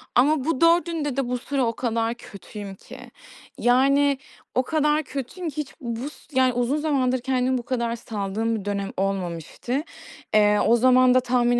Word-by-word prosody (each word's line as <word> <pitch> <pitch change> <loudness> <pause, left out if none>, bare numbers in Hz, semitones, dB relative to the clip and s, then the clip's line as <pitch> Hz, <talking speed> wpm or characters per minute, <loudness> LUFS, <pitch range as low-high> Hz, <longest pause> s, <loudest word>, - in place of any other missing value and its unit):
Ama 270 +2 +3
bu 315 -4 -1
4'ünde 335 -4 +2
de 270 -2 0
bu 250 - 0
sıra 270 +1 -1
o 230 - 0
kadar 230 -1 -1
kötüyüm 205 -3 -10
ki. - - -13 0.6
Yani, 275 +3 +3 0.4
o 255 - +3
kadar 300 +1 +1
kötüyüm 280 +6 -5
ki 295 - -12
hiç 300 -2 -4
bus 240 +4 -6
yani, 260 -1 +4
uzun 245 +4 0
zamandır 270 -4 +1
kendimi 255 0 0
bu 245 - -5
kadar 235 -2 -1
saldığım 220 0 -2
bir 205 -3 -5
dönem 200 -1 -2
olmamıştı. 195 - -2 0.5
Eee, 210 -1 +5
o 235 - +5
zaman 255 +1 +5
da 255 - +6
tahmin 245 -1 +2
250 Hz, 165 wpm, -24 LUFS, 230-275 Hz, 0.6 s, da